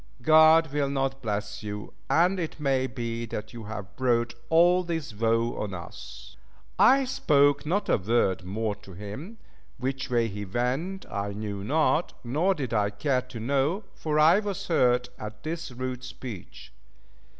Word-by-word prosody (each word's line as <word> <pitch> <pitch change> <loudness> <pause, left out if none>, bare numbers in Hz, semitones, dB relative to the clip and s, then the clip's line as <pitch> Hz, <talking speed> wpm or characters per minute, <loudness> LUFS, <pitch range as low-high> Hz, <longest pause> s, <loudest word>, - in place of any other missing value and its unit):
God 160 -1 +6
will 145 -2 +1
not 135 -1 -1
bless 105 -2 -3
you, 105 -1 -6 0.2
and 180 +3 +3
it 165 -2 -4
may 135 -2 +1
be 115 -2 -4
that 105 +2 -6
you 115 -2 -8
have 100 -3 -7
brought 120 -2 +1 0.2
all 175 +2 +5
this 160 -8 -4
woe 115 +2 +1
on 100 -3 -3
us." 60 -7 -10 0.4
I 270 +1 +6
spoke 145 - +3
not 200 +5 0
a - - +3
word 95 -2 +1
more 105 +3 -2
to 100 -2 -14
him; 105 - -8 0.4
which 130 +1 -3
way 120 -2 +2
he 105 -1 -5
went 130 - -2
I 100 0 -3
knew 100 -1 -5
not, 155 - +1
nor 155 +11 +1
did 130 -6 -4
I 105 -2 +2
care 125 +5 0
to 125 -2 -9
know, 140 - 0
for 155 -1 -2
I 160 +6 +6
was 205 -4 -4
hurt 125 -5 +3
at 105 0 -8
this 165 +1 -4
rude 130 0 -5
speech. 120 - -9
125 Hz, 160 wpm, -27 LUFS, 105-155 Hz, 0.4 s, God